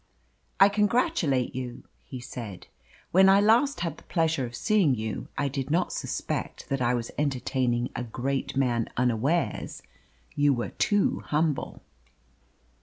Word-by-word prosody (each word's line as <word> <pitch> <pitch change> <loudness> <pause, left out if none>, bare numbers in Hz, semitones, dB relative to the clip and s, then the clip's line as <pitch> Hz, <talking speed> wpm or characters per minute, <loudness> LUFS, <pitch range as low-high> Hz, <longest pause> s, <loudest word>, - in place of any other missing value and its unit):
"I 195 - +9
congratulate 205 - +1
you," 125 -1 -6 0.2
he 130 - -8
said. 115 -6 -8 0.5
"When 190 +2 +6
I 195 +1 +6
last 235 +6 +3
had 170 -1 -2
the - - -16
pleasure 160 -6 0
of 120 - -9
seeing 190 - +2
you, 110 -1 -4
I 145 - +1
did 135 0 -3
not 170 +4 +1
suspect - - -4
that 135 -1 -1
I 125 0 +2
was 120 -1 -4
entertaining 130 -3 0
a 120 - -2
great 135 +3 -3
man 120 -4 +1
unawares 125 +7 0 0.5
you 145 -1 +3
were 120 - -3
too 205 -1 +1
humble." 150 -1 -1
135 Hz, 140 wpm, -27 LUFS, 125-175 Hz, 0.5 s, I